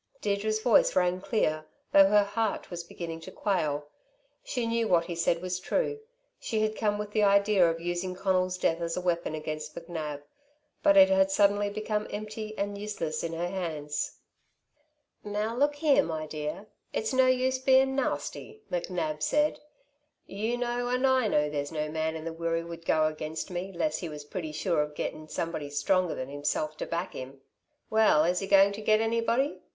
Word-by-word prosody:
Deirdre's 210 +1 0
voice 230 0 +4
rang 180 0 +2
clear, 155 -8 0 0.3
though 195 0 +8
her 205 +1 +5
heart 205 0 -2
was 170 -1 -5
beginning 170 -1 -7
to 165 - -10
quail. 155 -9 -1 0.6
She 250 - -2
knew 230 0 0
that - - -4
what 170 -1 +4
he 175 - -4
said 170 +1 0
was 180 0 -2
true. 440 - -1 0.4
She 220 -2 -1
had 215 0 0
come 210 -1 0
with 210 0 -5
the 215 - +1
idea 200 -3 +4
of 165 0 -2
using 175 +2 -3
Conal's 185 -1 +1
death 165 -2 0
as 165 0 -2
a - - -1
weapon 170 -3 -1
against 155 0 -5
McNab; 155 -4 -5 0.6
but 300 -1 +5
it 285 0 +9
had 285 0 +4
suddenly 205 -5 +3
become 210 0 -2
empty 215 +1 -6
and 200 0 -2
useless 170 -7 -3
in 165 0 -3
her 170 +2 -2
hands. 155 -6 -3 1.1
"Now 210 +2 -2
look 290 +3 +2
here, 290 -1 +4
my 160 -1 -3
dear, 155 +5 -5 0.3
it's 220 - -2
no 260 0 +5
use 255 0 +2
bein' 265 0 +4
nasty," 430 +9 -3
McNab 170 -3 -2
said. 300 - +2 0.7
"You 220 +5 -2
know 245 0 -1
and 250 +2 +1
I 260 -3 +3
know, 150 -6 +2
there's 145 0 -3
no 155 -1 -2
man 160 0 -1
in 160 0 -6
the 165 - -4
Wirree 165 0 -1
would 165 0 -9
go 155 -1 +3
against 155 +2 -4
me 180 +2 -4
'less 160 -3 -1
he 170 - -5
was 150 -1 -7
pretty 160 0 -5
sure 150 +1 0
of 150 0 -4
getting 155 +1 -4
somebody 165 -3 -3
stronger 170 +5 +1
than 130 +1 -5
himself 145 +2 -2
to - - -4
back 170 +3 -3
him. 135 +1 -8 0.5
Well, 220 -8 +5
is 175 +2 +1
he 195 - -4
going 195 0 +6
to 210 - -6
get 215 0 +3
anybody? 230 +4 +1
185 Hz, 190 wpm, -28 LUFS, 160-215 Hz, 1.1 s, it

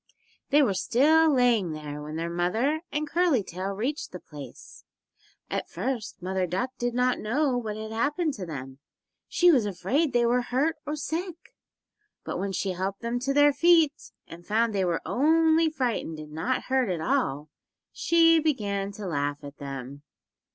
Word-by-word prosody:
They 290 +1 +5
were 215 -7 +2
still 310 +11 +4
lying 240 - +2
there 150 -1 -6
when 150 +1 -7
their 165 +1 -2
mother 220 - 0
and 300 +1 -2
Curly 330 - +2
Tail 185 +1 -5
reached 250 +10 -3
the 180 - -7
place. 145 -6 -12 0.6
At - - -3
first 230 -8 -4
Mother 185 0 -1
Duck 245 +9 -2
did 240 -1 -1
not 250 0 +2
know 260 +5 0
what 220 -3 -3
had 220 0 -6
happened 290 +7 0
to 195 -7 -6
them; 135 -3 -7 0.5
she 355 0 +5
was 245 -9 +3
afraid 205 - 0
they 240 -1 +2
were 245 +1 +2
hurt 275 +7 0
or 300 - -1
sick. 335 +3 -5 0.7
But - - -4
when 195 0 -2
she 195 +1 -2
had 185 - -4
helped 195 +1 -3
them 235 +1 -2
to 270 +3 -1
their 290 +1 +5
feet, 325 -1 +3
and 170 +1 -12
found 220 +3 +1
they 195 -2 +1
were 170 -2 -1
only 320 - +3
frightened 250 - -2
and 155 0 -9
not 165 +12 -1
hurt 260 -4 +1
at 175 -3 -1
all 150 -1 -1 0.4
she 330 -1 +4
began 205 -10 -1
to 205 0 -7
laugh 145 -4 -2
at 145 0 -10
them. 135 0 -7
230 Hz, 175 wpm, -27 LUFS, 180-290 Hz, 0.7 s, They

